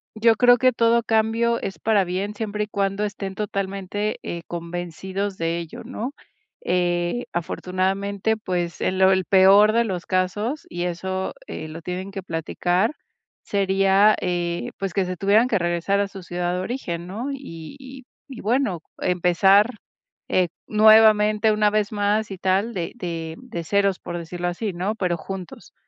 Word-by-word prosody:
yo 225 +1 +4
creo 245 0 +6
que 255 +1 +4
todo 230 0 +3
cambio 225 +1 +1
es 195 - -5
para 215 -3 +3
bien, 190 +3 -3
siempre 210 -1 -2
y - - -21
cuando 200 0 -1
estén 195 -2 -5
totalmente, 200 0 -3
eh, 170 - -5
convencidos 175 +3 -4
de 165 +1 -1
ello, 165 -2 -8
¿no?, 250 +6 -5 0.5
eh, 175 +5 0
afortunadamente, 195 +5 -1
pues, 175 -4 -3
en 185 - 0
lo 190 0 +6
el 185 -1 +2
peor 195 +2 +6
de 235 0 +3
los 180 -4 -4
casos, 205 +9 -1
y 175 0 -4
eso, 185 +2 -3
eh, 155 - -6
lo 160 +2 -8
tienen 185 +2 -4
que 195 -2 -6
platicar, 175 - 0 0.5
sería, 195 +1 +3
eh, 175 -1 -2
pues, 195 -2 -3
que 195 - +1
se 180 0 -4
tuvieran 210 +6 +4
que 210 - +2
regresar 175 +3 0
a 200 - +1
su 195 -2 -10
ciudad 175 0 -2
de 180 - -2
origen, 180 -7 -4
¿no?, 220 +8 -5
y 165 - -9
y 265 0 -11 0.3
y 260 -3 -9
bueno, 225 -5 0 0.2
empezar, 180 +4 +4 0.6
eh, 180 -1 +3 0.2
nuevamente 215 0 +5
una 210 0 +3
vez 210 -1 0
más 210 0 0
y 190 - -5
tal 195 +6 +1
de 170 -3 -4
de 165 -6 -5
de 240 -9 -6
ceros, 200 +1 +1
por 175 - -6
decirlo 175 +1 -4
así, 195 +4 -2
¿no?, 190 +5 -2
pero 180 -5 -1
juntos. 185 +2 -8
195 Hz, 165 wpm, -23 LUFS, 175-215 Hz, 0.6 s, creo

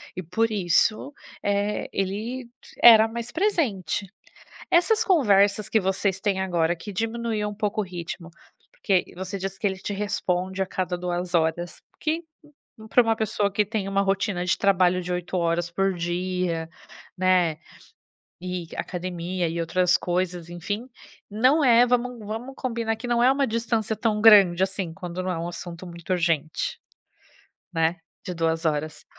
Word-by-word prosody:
e, 185 - -4
por 220 +7 0
isso, 210 +7 +1 0.3
eh, 205 +1 -1
ele 215 +7 -3
d 235 - -21 0.3
era 225 -2 +9
mais 235 +1 -5
presente. 230 - 0 0.6
Essas 440 +6 +4
conversas 205 - +3
que 220 - +3
vocês 190 0 0
têm 195 -2 0
agora, 175 -3 +1
que 200 +4 -9
diminuíam 225 0 -2
um - - -8
pouco 210 0 -1
o - - -1
ritmo, 170 -1 -7 0.4
porque 190 -4 +1
você 190 +2 -5
diz 195 +1 -4
que 210 - -2
ele 190 0 -5
te 205 - -5
responde 190 -2 -2
a - - -1
cada 180 -1 -2
2 175 0 -3
horas, 170 +1 0
porque 320 +2 -2 0.7
para 245 - +6
uma 225 -1 +1
pessoa 205 -2 0
que 210 +1 +1
tem 205 -2 -3
uma 195 0 +1
rotina 195 -2 0
de 175 - +1
trabalho 185 -2 +3
de 180 - -6
8 180 +1 -3
horas 170 0 0
por 195 +2 0
dia, 175 -1 -2 0.5
né, 180 -4 +3 0.8
e 180 -2 -4
academia 180 0 -3
e 170 +1 -3
outras 180 +2 +2
coisas, 180 -1 -2
enfim, 205 +8 -5 0.4
não 255 +9 +3
é 245 -1 +6
vamos 245 0 0
vamos 235 +5 -5
combinar 230 -3 -2
que 245 +2 -7
não 240 0 +2
é 255 - +6
uma 275 0 +2
distância 225 -1 -1
tão 215 -1 0
grande 195 -5 +7
assim, 190 -3 -1
quando 180 +1 -5
não 185 - -2
é 170 0 -3
assunto 175 0 -8
muito 170 0 -11
urgente, 175 - -1 1.0
né? 165 +1 +1 0.3
De 180 - -4
2 165 0 -1
horas. 150 0 -2
190 Hz, 160 wpm, -25 LUFS, 175-220 Hz, 1.0 s, era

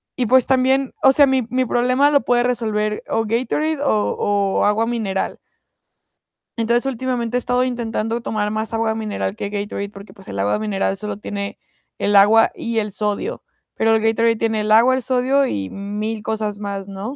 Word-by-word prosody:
y 250 - 0
pues, 255 +2 +4
también 265 0 +2
o 265 - +7
sea, 285 +1 +6
mi 265 -1 +2
mi 255 +1 0
problema 255 +4 +2
lo 285 -1 +4
puede 240 0 +3
resolver 215 -4 -1
o 225 - +1
Gatorade 265 +7 -1
o 215 -7 +1
o 200 -1 +1
agua 215 +2 +2
mineral. 220 -5 -2 1.2
Entonces, 235 +2 +1
últimamente 245 -2 -2
he - - +3
estado 250 +1 0
intentando 230 -2 -2
tomar 210 -2 -2
más 220 +1 -3
agua 225 -1 0
mineral 205 - -3
que 200 - -4
Gatorade, 200 0 -4
porque, 200 0 -13
pues, 195 - -14
el 100 - -5
agua 100 +1 +1
mineral 205 -2 -1
solo 210 +1 -5
tiene 200 -1 -5 0.4
el 205 0 0
agua 215 +3 +6
y 230 -1 -4
el 210 -1 -3
sodio, 210 - -2 0.3
pero 225 0 +2
el 220 - +1
Gatorade 225 +1 +2
tiene 220 -1 0
el 215 - -1
agua, 235 +4 +6
el 260 - -2
sodio 260 +3 +2
y 100 - -3
mil 210 +2 -4
cosas 215 -1 -2
más, 200 -1 -5
¿no? 200 +7 -6
225 Hz, 185 wpm, -20 LUFS, 210-250 Hz, 1.2 s, o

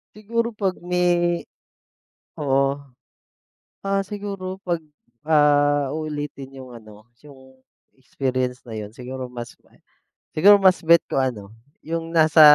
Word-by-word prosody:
Siguro 230 +2 -2
'pag 195 -4 -1
may 175 -1 +1 0.9
Oo. 140 -1 +1 1.0
Ah, 195 0 0
siguro 195 -2 -6
pag, 175 -2 -1 0.5
ah, 145 -2 +4
uulitin 145 -3 -5
yung 130 -1 -11
ano 110 0 -15 0.2
yung 130 -2 -16 0.4
experience 130 -2 -2
na 110 - -6
'yon, 105 0 -6
siguro 130 +2 -7
mas 120 -1 -8 0.8
siguro 200 +6 +7
mas 190 -2 +4
bet 170 0 +5
ko 135 - 0
ano, 110 -6 -3 0.3
yung 165 0 -3
nasa 160 -1 +5
150 Hz, 115 wpm, -23 LUFS, 130-180 Hz, 1.0 s, siguro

